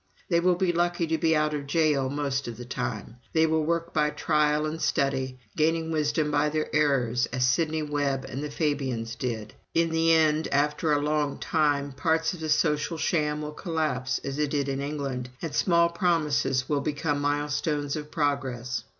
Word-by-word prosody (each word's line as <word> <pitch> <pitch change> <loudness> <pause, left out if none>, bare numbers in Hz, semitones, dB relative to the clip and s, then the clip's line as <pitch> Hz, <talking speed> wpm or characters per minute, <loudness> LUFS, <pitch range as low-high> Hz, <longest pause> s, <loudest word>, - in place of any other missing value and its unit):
They 170 -2 +3
will 180 +1 +3
be 180 0 +1
lucky 175 0 +1
to 160 0 -1
be 160 0 +3
out 150 0 +1
of 145 -1 -4
jail 145 -3 +2
most 140 -2 -2
of 115 -2 -6
the 125 - -8
time. 120 -2 -4 0.2
They 160 0 +4
will 160 0 +1
work 170 +1 -1
by 150 -1 +2
trial 150 0 +1
and 155 +1 -4
study, 130 -2 0 0.2
gaining 160 +1 +1
wisdom 150 -1 0
by 145 +1 +2
their 155 -1 -2
errors, 130 -5 +2
as 125 0 0
Sidney 160 +3 +1
Webb 145 -2 -1
and 135 +3 -5
the 150 - -3
Fabians 135 -7 -2
did. 115 -4 -4 0.2
In 165 0 +2
the 165 0 +3
end, 155 -1 +3
after 150 +2 +1
a 145 - +3
long 150 -1 0
time, 145 -3 +1
parts 160 +4 0
of 180 - -8
the 160 -1 -4
social 150 +2 +1
sham 150 -2 0
will 150 - -4
collapse, 155 -7 -1
as 140 +1 -4
it 150 -1 +1
did 140 -1 -1
in 135 0 -2
England, 140 -4 -3
and 160 -3 -5
small 170 +1 +3
promises 155 -7 +1
will 145 -2 0
become 145 0 -1
milestones 145 0 -1
of 150 -1 -6
progress. 135 -5 -1
150 Hz, 185 wpm, -27 LUFS, 140-160 Hz, 0.2 s, They